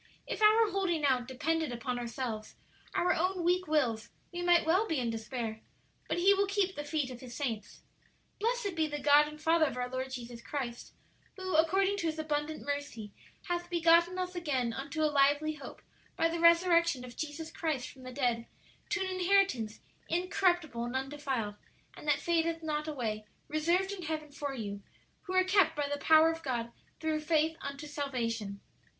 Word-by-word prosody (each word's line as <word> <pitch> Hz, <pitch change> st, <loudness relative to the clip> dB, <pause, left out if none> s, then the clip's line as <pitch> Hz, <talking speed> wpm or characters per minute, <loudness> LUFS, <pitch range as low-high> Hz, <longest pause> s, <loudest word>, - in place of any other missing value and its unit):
If -, -, -5 dB
our 430 Hz, 0 st, +6 dB
holding 355 Hz, -6 st, 0 dB
out 255 Hz, -3 st, +2 dB
depended 315 Hz, +3 st, -1 dB
upon 245 Hz, +1 st, -3 dB
ourselves, 235 Hz, -2 st, -4 dB, 0.4 s
our 360 Hz, +1 st, +3 dB
own 365 Hz, +1 st, 0 dB
weak 360 Hz, +1 st, +2 dB
wills, 240 Hz, -8 st, +1 dB, 0.2 s
we 350 Hz, -, -3 dB
might 350 Hz, -1 st, +4 dB
well 370 Hz, +7 st, +3 dB
be 320 Hz, -, 0 dB
in 240 Hz, -3 st, 0 dB
despair; 225 Hz, 0 st, -4 dB, 0.5 s
but -, -, -1 dB
'He 380 Hz, +3 st, +6 dB
will 400 Hz, 0 st, +2 dB
keep 395 Hz, -1 st, +1 dB
the 295 Hz, -, -4 dB
feet 290 Hz, -3 st, -2 dB
of 245 Hz, -, -8 dB
His 245 Hz, -2 st, -9 dB
saints.' 235 Hz, -7 st, -4 dB, 0.6 s
"'Blessed 455 Hz, -2 st, 0 dB
be 320 Hz, -1 st, +1 dB
the 295 Hz, -1 st, -4 dB
God 290 Hz, +1 st, +5 dB
and 300 Hz, 0 st, -9 dB
Father 320 Hz, 0 st, +3 dB
of 260 Hz, -, -5 dB
our 250 Hz, 0 st, -1 dB
Lord 260 Hz, +1 st, -3 dB
Jesus 240 Hz, -2 st, -7 dB
Christ, 240 Hz, -3 st, -5 dB, 0.4 s
who, 375 Hz, 0 st, -4 dB
according 385 Hz, +5 st, +3 dB
to 340 Hz, -4 st, -1 dB
His 320 Hz, 0 st, -2 dB
abundant 310 Hz, 0 st, -2 dB
mercy, 285 Hz, -7 st, -4 dB, 0.3 s
hath 350 Hz, 0 st, -3 dB
begotten 340 Hz, +1 st, +4 dB
us 365 Hz, 0 st, -2 dB
again 270 Hz, -9 st, -1 dB
unto 280 Hz, +5 st, -3 dB
a -, -, +5 dB
lively 290 Hz, +2 st, +3 dB
hope 305 Hz, -, -10 dB, 0.3 s
by 330 Hz, -, +3 dB
the 335 Hz, +1 st, -3 dB
resurrection 335 Hz, -5 st, +4 dB
of 240 Hz, -1 st, -11 dB
Jesus 315 Hz, +1 st, -5 dB
Christ 310 Hz, -7 st, -2 dB
from 265 Hz, -, -13 dB
the 255 Hz, 0 st, -8 dB
dead, 245 Hz, -3 st, 0 dB, 0.4 s
to 415 Hz, -2 st, 0 dB
an -, -, +1 dB
inheritance 370 Hz, -, +1 dB, 0.3 s
incorruptible 350 Hz, -7 st, +1 dB
and 240 Hz, +2 st, -4 dB
undefiled, 265 Hz, -6 st, -2 dB, 0.4 s
and -, -, -11 dB
that 290 Hz, -1 st, +3 dB
fadeth 330 Hz, -1 st, 0 dB
not 305 Hz, -1 st, -2 dB
away, 220 Hz, -8 st, -3 dB, 0.2 s
reserved 340 Hz, +6 st, +1 dB
in 400 Hz, -2 st, -5 dB
heaven 310 Hz, -2 st, -4 dB
for 285 Hz, -1 st, -4 dB
you, 205 Hz, -4 st, -5 dB, 0.5 s
who 370 Hz, -, -3 dB
are 370 Hz, -, +6 dB
kept 370 Hz, -4 st, +3 dB
by 290 Hz, -1 st, -1 dB
the 285 Hz, 0 st, -3 dB
power 320 Hz, +1 st, +6 dB
of 325 Hz, 0 st, -6 dB
God 235 Hz, -4 st, -2 dB, 0.3 s
through 315 Hz, -1 st, 0 dB
faith 315 Hz, +1 st, +1 dB
unto 280 Hz, +2 st, -6 dB
salvation.' 230 Hz, -9 st, -3 dB
305 Hz, 180 wpm, -31 LUFS, 255-345 Hz, 0.6 s, our